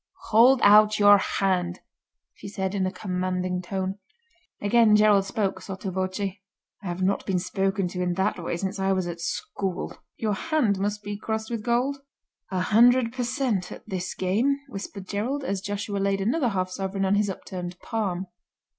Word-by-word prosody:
"Hold 245 +4 +6
out 215 +1 +7
your 205 -1 +7
hand," 185 -3 0 0.5
she - - -10
said 190 -2 -3
in 190 -2 0
a - - -2
commanding 185 -1 -2
tone. 190 +2 -3 0.6
Again 215 +1 +4
Gerald 210 -2 +5
spoke, 195 -1 -2
sotto 190 0 -5
voce: 185 +1 -2
"I 200 0 -8
have 175 +1 -3
not 195 +1 +1
been 190 - +1
spoken 195 +1 -1
to 180 0 -4
in 180 -1 0
that 190 -1 -1
way 165 - -2
since 195 +2 -3
I 195 0 +2
was 185 -1 0
at 170 -1 -6
school." 190 +2 -3 0.2
"Your 215 -2 0
hand 220 -3 +1
must 205 +1 -2
be 205 0 -4
crossed 220 +1 -3
with 230 -2 -2
gold." 250 +5 0 0.5
"A 185 -1 -1
hundred 235 +4 +4
per 255 - -3
cent. 240 -7 -1
at - - -10
this 185 -1 -4
game," 225 +10 +1
whispered 195 -2 -7
Gerald, 245 +9 -2
as 200 -7 -2
Joshua 205 0 -3
laid 195 0 +1
another 245 +7 +1
half 185 -3 -2
sovereign 195 +1 -2
on 190 - +2
his 205 0 +2
upturned 180 -1 -6
palm. 195 -5 -2
195 Hz, 175 wpm, -26 LUFS, 185-215 Hz, 0.6 s, out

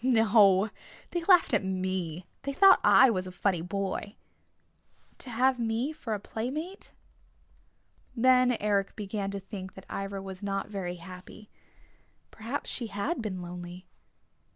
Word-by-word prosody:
"... - - -23
No, 215 -4 +4 0.4
they 345 -1 -2
laughed 360 -2 +5
at - - +3
me. 185 -3 -3 0.2
They 275 - -4
thought 390 +6 +7
I 265 -2 +7
was 185 -3 -2
a - - -7
funny 180 -1 0
boy." 195 +3 -4 1.0
"To 260 - -7
have 250 +2 +2
me 235 +6 -1
for 230 -8 -4
a - - -5
playmate?" 290 - -5 1.2
Then 250 0 +4
Eric 200 -2 0
began 200 -1 -3
to 200 0 -4
think 190 -1 -8
that 190 - -12
Ivra 195 0 -4
was 190 -1 -8
not 195 0 -3
very 185 -4 -4
happy. 185 +4 -12 0.8
Perhaps 230 +6 -5
she 240 - -3
had 220 - -2
been 185 -5 -4
lonely. 175 +1 -8
205 Hz, 145 wpm, -29 LUFS, 190-245 Hz, 1.2 s, thought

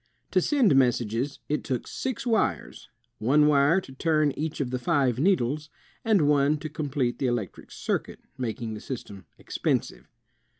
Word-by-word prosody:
To 185 - +3
send 245 - +3
messages, 125 +1 +1
it 150 - -1
took 130 -3 -3
six 260 -3 -4
wires, 220 - -1 0.3
one 145 +7 +4
wire 150 +4 +4
to 135 - -12
turn 155 +1 +2
each 155 +3 -4
of 130 -4 -2
the 130 - -2
five 130 -4 +1
needles, 150 -3 +1 0.3
and 205 -10 +3
one 145 +1 +3
to 155 +1 -6
complete 145 -5 -2
the 135 - +1
electric 120 -5 -3
circuit, - - -3 0.2
making 115 -3 -4
the 105 - -6
system 100 -7 -7
expensive. - - -2
140 Hz, 155 wpm, -26 LUFS, 125-155 Hz, 0.3 s, one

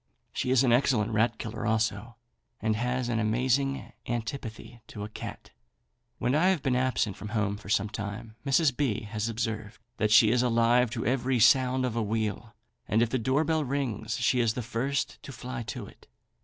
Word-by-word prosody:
She - - -2
is 130 0 +4
an 120 -3 +4
excellent 120 -4 +2
rat 110 +1 +2
killer 110 0 -5
also, 110 +1 -1 0.4
and 110 -1 0
has 125 +2 -1
an 120 -2 0
amazing 130 +5 0
antipathy 115 -1 -5
to 105 - -7
a 105 - -6
cat. - - -8 0.7
When 125 +2 0
I 160 +5 +4
have 190 -6 +2
been 130 -3 +1
absent 125 -6 0
from 105 - -7
home 105 -1 0
for 100 -1 -11
some 105 0 +2
time, 105 +2 -6
Mrs. 140 0 +3
B. 130 -7 0
has 105 +1 -3
observed 110 -2 -4 0.2
that 105 - +1
she 110 0 +7
is 120 0 +3
alive 120 0 +3
to 115 -1 -4
every 125 +1 +1
sound 130 +2 +4
of 120 -3 -2
a 115 - +1
wheel, 110 +1 -2 0.3
and 110 +2 +3
if 115 - -2
the 130 - +1
door 130 +6 +2
bell 160 -1 +1
rings 135 -4 -2
she 125 - +2
is 115 -2 +2
the 125 - -3
first 125 +5 -2
to - - -9
fly 125 +1 -6
to 120 -2 -5
it. - - -17
115 Hz, 195 wpm, -28 LUFS, 110-130 Hz, 0.7 s, she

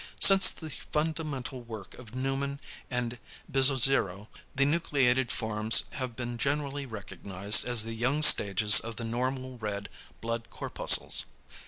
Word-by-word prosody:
Since 195 -1 +7
the 160 -2 -7
fundamental 150 -3 -6
work 110 -5 -11
of 120 -1 -14
Neumann 135 +2 -4 0.3
and 125 -1 -5 0.3
Bizzozero, 130 -7 0 0.3
the 140 +1 +1
nucleated 135 -5 -1
forms 110 0 +2
have 130 -3 -7
been 120 -1 -7
generally 140 0 -4
recognised 100 -2 -1
as 120 -3 +1
the 115 0 -7
young 130 +7 -2
stages 105 -6 +6
of 115 0 -8
the 115 - -8
normal 130 +2 -5
red 100 -2 -6 0.3
blood 115 0 -6
corpuscles. - - +2
125 Hz, 130 wpm, -27 LUFS, 110-140 Hz, 0.3 s, Since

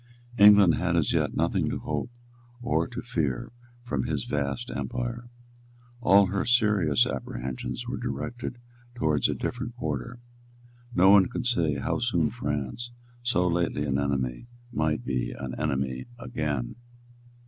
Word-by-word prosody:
England 100 -4 +8
had 90 +1 0
as 80 - +2
yet - - +1
nothing - - +1
to - - -2
hope - - -3 0.5
or 120 - +1
to 125 0 -6
fear 75 - -2 0.3
from 70 - -2
his - - -1
vast 75 - -2
empire. 120 0 -4 0.7
All 100 -3 +6
her 95 +1 -1
serious 105 - +3
apprehensions 65 - -4
were 125 - -3
directed 120 0 -4 0.4
towards 75 - +2
a - - 0
different 120 -1 -4
quarter. 80 - -4 0.8
None 95 +1 +7
could 125 - -4
say 85 -12 +2
how 70 - -1
soon - - +1
France, 75 - -3 0.3
so 105 -7 +2
lately 85 -4 0
an 70 -1 0
enemy, 70 - -1 0.2
might 80 - 0
be 65 -2 -1
an 65 -2 -6
enemy 65 -4 -1
again. 75 - -3
85 Hz, 135 wpm, -27 LUFS, -, 0.8 s, England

